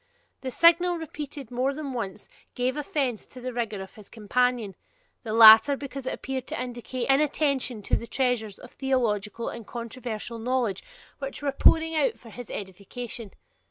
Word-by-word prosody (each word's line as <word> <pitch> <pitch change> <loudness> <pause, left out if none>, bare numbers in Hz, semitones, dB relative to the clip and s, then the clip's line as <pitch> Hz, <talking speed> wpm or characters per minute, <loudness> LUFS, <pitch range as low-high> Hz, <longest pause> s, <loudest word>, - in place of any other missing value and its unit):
This 260 -2 -6
signal, 345 +1 +5
repeated 295 -5 -7
more 260 +3 0
than 285 -3 -5
once, 210 -4 -5 0.3
gave 250 +1 0
offence 285 - -2
to 255 - -12
the 250 0 -5
rigour 225 -4 -2
of 190 - -13
his 215 -4 -14
companion, 235 -1 0 0.5
the 225 - -5
rather 225 +5 +9
because 275 -1 -7
it - - -1
appeared 260 -1 -5
to - - -4
indicate 245 0 -4
inattention 275 -4 +1
to - - +1
the 235 - -4
treasures 240 -6 -1
of 250 - -13
theological 230 -5 -1
and 230 -3 -8
controversial 235 -1 -6
knowledge 235 -4 0 0.4
which 275 +1 -5
were 280 - +1
pouring 325 +4 +4
out 450 +9 +1
for 230 - -14
his 245 +1 -9
edification. 205 +4 -7
250 Hz, 160 wpm, -26 LUFS, 225-275 Hz, 0.5 s, rather